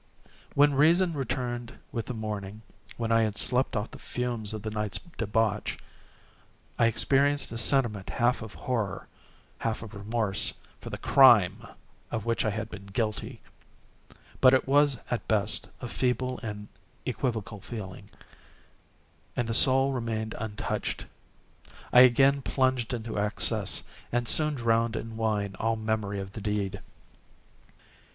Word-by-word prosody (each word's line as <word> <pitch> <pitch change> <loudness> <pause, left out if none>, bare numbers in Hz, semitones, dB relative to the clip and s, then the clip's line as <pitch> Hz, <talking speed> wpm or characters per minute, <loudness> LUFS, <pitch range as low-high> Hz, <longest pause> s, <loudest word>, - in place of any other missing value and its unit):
When 145 0 +5
reason 165 +5 +4
returned 125 -3 -4
with 115 -2 -4
the 125 - -4
morning—when 110 +1 -6
I 115 0 +4
had 110 -2 -1
slept 130 +1 +2
off 105 +1 -2
the - - -11
fumes 120 -4 -3
of 110 -2 -6
the 110 - -4
night's 105 -2 -1
debauch—I 115 - -4
experienced 140 +5 +2
a 115 - -4
sentiment 115 -6 +2
half 120 +1 +1
of 110 -6 -9
horror, 105 +1 -3 0.5
half 115 0 -2
of 110 -1 -10
remorse, 100 - 0 0.2
for - - -8
the - - -5
crime 120 -10 +5 0.5
of 110 -3 -4
which 115 0 +1
I - - +2
had 110 +1 -4
been 100 -2 -9
guilty; 110 +3 -3 1.0
but 130 0 +7
it 130 - 0
was, 145 0 +4
at 120 - -2
best, 110 -1 +1
a 125 - -4
feeble 125 +4 -1
and 105 -2 -6 0.4
equivocal 110 -5 -3
feeling, 100 -3 -8 1.3
and 120 - -1
the 115 - -1
soul 135 +3 +5
remained 115 -3 -3
untouched. 110 -2 -4 0.9
I 125 - +8
again 135 +3 +6
plunged 130 -3 0
into 115 -3 -3
excess, 105 0 +1 0.3
and 120 0 0
soon 150 -1 +3
drowned 115 -2 +1
in 115 0 -5
wine 105 -3 -1
all 115 +1 +1
memory 110 -2 -2
of 95 0 -6
the 110 - -7
deed. 100 -2 -2
115 Hz, 135 wpm, -28 LUFS, 105-125 Hz, 1.3 s, I